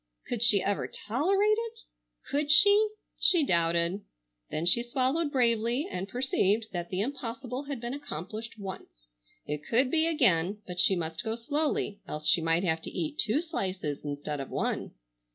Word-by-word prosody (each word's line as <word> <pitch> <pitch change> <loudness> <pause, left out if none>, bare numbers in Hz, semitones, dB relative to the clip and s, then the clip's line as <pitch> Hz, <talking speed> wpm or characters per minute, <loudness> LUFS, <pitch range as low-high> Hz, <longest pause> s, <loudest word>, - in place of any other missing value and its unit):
Could 240 -3 -4
she 215 -4 +6
ever 200 0 -1
tolerate 390 - +1
it? 460 0 -7 0.5
Could 290 +1 0
she? 410 +7 +7 0.3
She 345 -4 +4
doubted. 170 0 +1 0.5
Then 155 - -3
she 180 +7 +6
swallowed 265 +6 0
bravely 240 +3 +1
and 185 +2 -4
perceived 225 -3 +1
that 175 -1 -4
the 185 +1 -2
impossible 255 +1 -4
had 280 -3 -5
been 240 +2 -5
accomplished 225 - -6
once. 195 -2 -8 0.6
It 150 0 -4
could 255 - +1
be 325 0 +3
again, 200 - +2
but 180 -1 -5
she 190 - +5
must 165 +2 -3
go 220 -1 -2
slowly 285 -4 -2
else 150 0 -3
she 170 - +5
might 165 +2 +1
have 160 -3 0
to - - -6
eat 305 -2 -4
two 235 +9 +2
slices 185 - -4
instead 145 0 -4
of 135 - -6
one. - - -3
230 Hz, 165 wpm, -28 LUFS, 180-285 Hz, 0.6 s, she